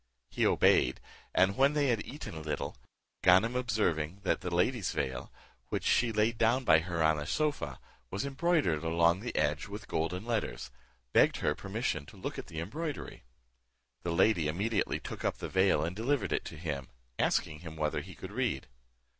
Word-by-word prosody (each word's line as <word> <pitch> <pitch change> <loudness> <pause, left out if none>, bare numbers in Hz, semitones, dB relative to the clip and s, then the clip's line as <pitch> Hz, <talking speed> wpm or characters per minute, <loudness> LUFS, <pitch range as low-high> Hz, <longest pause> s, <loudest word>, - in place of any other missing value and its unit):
He - - +2
obeyed; - - +4 0.3
and 95 +1 +3
when 140 +4 +4
they 145 -2 +2
had 115 -4 +1
eaten 145 - -8
a 80 - -6
little, 75 -1 -3 0.5
Ganem 95 +7 +5
observing 100 -8 0
that 95 - +1
the 90 - -3
lady's 90 +4 +1
veil, 70 -4 -3 0.4
which - - -2
she 120 -2 +3
laid 110 +1 +1
down 120 +4 +3
by 80 -9 +6
her 85 -1 -1
on 80 -1 +3
a 75 - -5
sofa, 145 - -1 0.3
was 100 +5 -3
embroidered 140 - +1
along 85 +2 +3
the 120 +4 -5
edge 75 +1 +1
with 105 +1 -8
golden 90 +5 -2
letters, 105 - -2 0.4
begged - - +5
her 75 - +1
permission 95 - -3
to - - -13
look - - -5
on - - -6
the 80 - -6
embroidery. 145 - -5 0.8
The 85 - -2
lady 85 -1 +3
immediately 100 +7 0
took - - -7
up - - 0
the - - -5
veil, 95 -5 +3
and 85 +3 -4
delivered 120 +3 0
it - - 0
to 80 - -7
him, 75 -5 -4 0.3
asking 75 - +1
him 80 -1 -9
whether 75 -1 -1
he - - -11
could - - -8
read? - - -1
95 Hz, 180 wpm, -31 LUFS, 80-115 Hz, 0.8 s, by